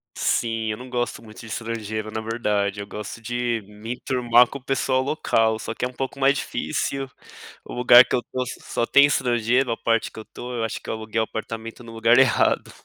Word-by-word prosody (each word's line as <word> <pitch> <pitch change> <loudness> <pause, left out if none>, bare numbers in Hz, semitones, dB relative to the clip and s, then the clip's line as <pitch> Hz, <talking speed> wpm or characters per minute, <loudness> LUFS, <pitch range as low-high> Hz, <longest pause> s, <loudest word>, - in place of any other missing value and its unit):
Sim, 115 -1 0
eu 105 - -4
não 125 +1 -10
gosto 120 -1 -2
muito 110 -1 -13
de - - -10
estrangeiro 110 -1 -4
na 110 - -3
verdade, 105 -3 -1
eu 100 - -7
gosto 105 +2 -7
de 120 0 -1
me 105 +3 -7
enturmar 125 -1 +3
com 140 - -8
o - - -27
pessoal 130 -1 +1
local, 115 -6 +1
só 115 - -5
que 125 - -2
é - - 0
um 125 - -12
pouco 135 +1 -5
mais 140 +1 +4
difícil. 135 -1 -3 0.6
O - - -9
lugar 125 0 +8
que - - -1
eu 125 - 0
tô 130 0 -1 0.2
só 120 - -2
tem 140 +3 +6
estrangeiro, 125 -2 +1
a 115 - -1
parte 115 -1 +1
que - - -10
eu 110 - -9
tô. 125 0 -8
Eu 115 - -2
acho 115 - -3
que - - -10
eu - - -1
aluguei 110 0 -3
apartamento 115 +1 -6
no 115 - -10
lugar 115 +2 +3
errado. 130 -4 +3
115 Hz, 220 wpm, -23 LUFS, 110-125 Hz, 0.6 s, lugar